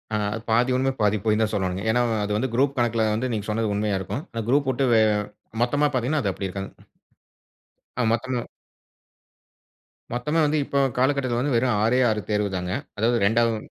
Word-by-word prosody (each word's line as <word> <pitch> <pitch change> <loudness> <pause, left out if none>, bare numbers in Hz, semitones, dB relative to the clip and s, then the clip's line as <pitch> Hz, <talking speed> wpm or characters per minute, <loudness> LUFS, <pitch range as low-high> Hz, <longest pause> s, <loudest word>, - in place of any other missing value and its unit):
ஆ - - +2 0.3
பாதி 120 +3 +3
உண்ம 135 +1 +1
பாதி 105 0 +3
பொய் 105 -1 +3
தான் 110 -1 +1
சொல்லனும்ங்க. 95 -2 -1
ஏனா, 120 +2 +3 0.2
அது 105 - -3
வந்து 130 +4 -1
குரூப் 135 +3 +2
கணக்குல 115 -2 +1
வந்து 125 +4 -2
நீங்க 105 -3 -3
சொன்னது 110 0 0
உண்மையா 105 -1 0
இருக்கும். 110 +9 -4 0.3
குரூப்வுட்டு 135 -1 +2
வெ - - +5 0.6
மொத்தமா 145 +5 +2
பார்த்தீங்கன்னா 130 +3 0
அது 100 - +1
அப்டி 95 +1 -4
இருக்காது. 95 +1 -5 1.3
ஆ - - +3
மொத்தமும், 120 +1 -2 1.7
மொத்தமே 150 +7 0
வந்து 150 +1 +1
இப்ப 140 - -2 0.2
காலகட்டத்துல 130 -2 +1
வந்து 140 +1 0
வெறும் 120 -1 +2
6ஏ 115 +4 +3
6 110 -1 0
தேர்வுதாங்க. 95 -4 -1 0.3
அதாவது 115 +3 +2
2வது 115 +2 +2
115 Hz, 160 wpm, -24 LUFS, 105-130 Hz, 1.7 s, வெ